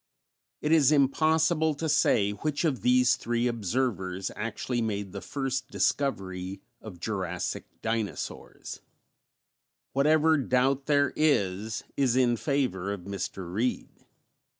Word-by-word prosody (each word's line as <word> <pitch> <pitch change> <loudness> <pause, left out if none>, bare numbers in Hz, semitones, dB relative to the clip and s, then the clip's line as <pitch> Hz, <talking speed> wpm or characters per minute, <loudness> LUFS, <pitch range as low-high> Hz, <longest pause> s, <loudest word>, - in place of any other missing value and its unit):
It 150 - 0
is 155 -4 +5
impossible 155 +2 +3
to 160 +3 -3
say 105 -8 +3
which 145 - -2
of 145 -6 0
these 125 0 +4
three 120 +1 -1
observers 105 -5 -1
actually 115 +3 -3
made 100 -3 -2
the 100 0 -6
first 135 -2 -3
discovery 95 -11 -1 0.2
of 95 -6 -10
Jurassic 95 0 -3 0.2
dinosaurs; 110 -2 -4 1.1
whatever 155 +3 +4
doubt 130 +1 +1
there 145 -2 +3
is 110 -8 +1
is 130 -3 +2
in 125 -2 +3
favor 125 - -1
of 100 -2 -4
Mr. 95 -1 -5
Reed. 120 +5 -3
125 Hz, 115 wpm, -28 LUFS, 100-140 Hz, 1.1 s, is